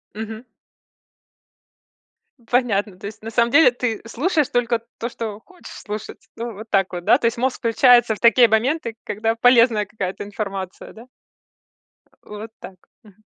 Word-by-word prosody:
Мгм. 220 +2 -7 2.0
Понятно. 215 -6 0
То 200 - -7
есть, 215 +1 -11
на 225 - -6
самом 235 +1 +2
деле, 320 -6 +6
ты 245 -3 -3
слушаешь 300 +4 0
только 240 -1 0 0.2
то, 235 - -3
что 220 -3 -6
хочешь 370 -2 -14
слушать. 210 0 -8
Вот 225 -1 -7
так 195 -2 +1
вот, 175 -1 -5
да? - - +5
То - - -4
есть 230 +1 +1
мозг 255 +1 -1
включается 240 0 +4
в - - -15
такие 240 0 +6
моменты, 230 +2 0
когда 225 +2 -1
полезная 230 -3 +4
какая-то 195 -2 -5
информация, 195 -2 -6
да? 225 - -13
Э, - - -18 1.2
вот 210 +2 -9
так. 190 - -11 0.3
Мгм. 210 +1 -21
225 Hz, 155 wpm, -21 LUFS, 210-240 Hz, 2.0 s, деле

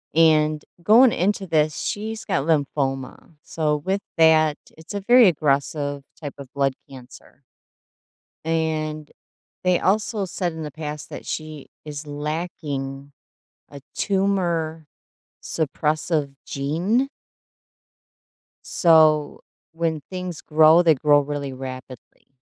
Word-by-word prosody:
And 155 -2 +4 0.2
going 230 +6 +6
into 195 +2 0
this, 155 -3 +1
she's 220 +2 -4
got 140 +1 -1
lymphoma. 140 -2 -1
So, 150 -2 -1
with 190 +6 -2 0.2
that, 155 -2 +5 0.2
it's 160 +5 -11
a 200 - -2
very 240 +1 +6
aggressive 145 -2 0 0.2
type 145 -3 -6
of 135 -2 -10
blood 140 -1 +1 0.2
cancer 130 +1 -14 1.0
and 155 -2 -2 0.5
they 180 -1 +3
also 210 +1 0
said 175 -2 -3
in 160 -1 -6
the 150 - -6
past 150 -1 -7
that - - -9
she 155 -2 -6 0.2
is 150 0 -7
lacking 145 -2 -5 0.6
a 140 -1 -11
tumor 175 -6 -1 0.6
suppressive 150 -1 -1
gene 175 - 0 1.6
so 155 -3 +3 0.3
when 165 -2 -2
things 180 -3 -6
grow, 155 +2 +5
they 160 -3 +4
grow 145 +2 +4
really 140 -1 -4
rapidly. 130 -1 -10
155 Hz, 110 wpm, -23 LUFS, 145-170 Hz, 1.6 s, going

